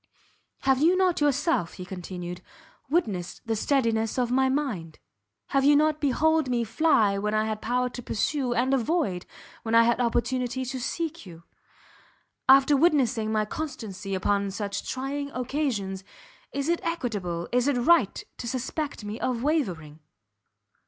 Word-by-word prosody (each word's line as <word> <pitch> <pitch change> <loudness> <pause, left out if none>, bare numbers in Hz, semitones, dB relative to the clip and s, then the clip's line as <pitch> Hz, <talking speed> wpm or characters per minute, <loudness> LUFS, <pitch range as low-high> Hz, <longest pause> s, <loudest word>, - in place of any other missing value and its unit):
"Have 265 0 +2
you 345 +4 +4
not 365 -4 +2
yourself," 290 - +1
he 180 - -8
continued, 180 -1 -7 0.5
"witnessed 200 - -1
the 225 -1 0
steadiness 225 -2 +1
of 245 -1 0
my 265 +1 +3
mind? 230 - -2 0.5
Have 275 -1 +2
you 290 +1 +6
not 305 +1 +2
beheld 310 +1 +2
me 240 -1 +1
fly, 220 -5 +2
when 210 +1 -1
I 215 0 +2
had 215 -1 -3
power 250 +2 0
to 245 - -8
pursue, 255 +3 -1
and 250 +2 +1
avoid, 270 - 0 0.3
when 225 0 -1
I 230 - +8
had 235 +1 +2
opportunity 250 +2 0
to 260 +1 -4
seek 325 - -4
you? 170 -1 -12 1.1
After 275 +2 +7
witnessing 260 -8 +2
my 215 -1 +1
constancy 210 -8 -5
upon 200 +1 0
such 200 0 -4
trying 280 +2 -3
occasions, 240 -8 -2 0.5
is 280 +1 -2
it 340 0 +1
equitable, 210 - -3
is 250 +2 +2
it 285 -3 +2
right 245 - +3 0.2
to 240 - -5
suspect 260 +1 -3
me 210 +2 -5
of 245 -2 -1
wavering?" 180 - -1
245 Hz, 150 wpm, -26 LUFS, 205-285 Hz, 1.1 s, I